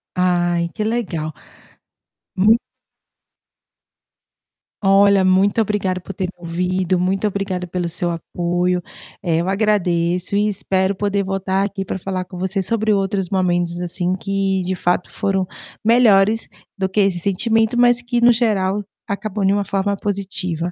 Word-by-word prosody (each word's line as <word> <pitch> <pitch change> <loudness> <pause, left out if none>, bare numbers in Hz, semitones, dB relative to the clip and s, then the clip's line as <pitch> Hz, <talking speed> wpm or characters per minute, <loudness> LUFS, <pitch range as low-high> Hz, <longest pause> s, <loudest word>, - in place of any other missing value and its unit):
Ai 175 -1 +1
que 215 - -3
legal. 185 -9 -2 1.0
Mu 210 +4 +5 2.3
Olha, 195 0 +5
muito 190 +4 +3
obrigada 195 -3 -1
por 195 - -8
ter 185 -1 -3
ouvido, 180 +2 -1
muito 190 +3 0
obrigada 190 -3 -3
pelo 175 0 -2
seu 175 +1 -2
apoio. 175 +1 -1 0.4
Eh, 165 -2 0
eu 180 - -2
agradeço 185 -3 +1
e 210 - +2
espero 190 -1 0
poder 200 0 0
voltar 195 0 -1
aqui 200 -1 -4
para 190 0 -4
falar 185 0 -3
com 180 0 -11
você 190 +2 -1
sobre 220 +1 +1
outros 195 -2 -1
momentos, 175 -2 0
assim, 180 +1 -1
que 195 0 -1
de 185 +1 -2
fato 180 0 0
foram 195 -3 0 0.4
melhores 220 -2 +4 0.3
do 190 -1 0
que 195 +2 +1
esse 195 -3 +1
sentimento, 220 +5 +1
mas 240 0 +4
que 240 0 -1
no 245 +1 +7
geral 210 -4 +1 0.2
acabam 200 0 -3
de 195 - +4
uma 200 0 +1
forma 200 +1 -1
positiva. 180 -4 -3
190 Hz, 140 wpm, -20 LUFS, 180-205 Hz, 2.3 s, no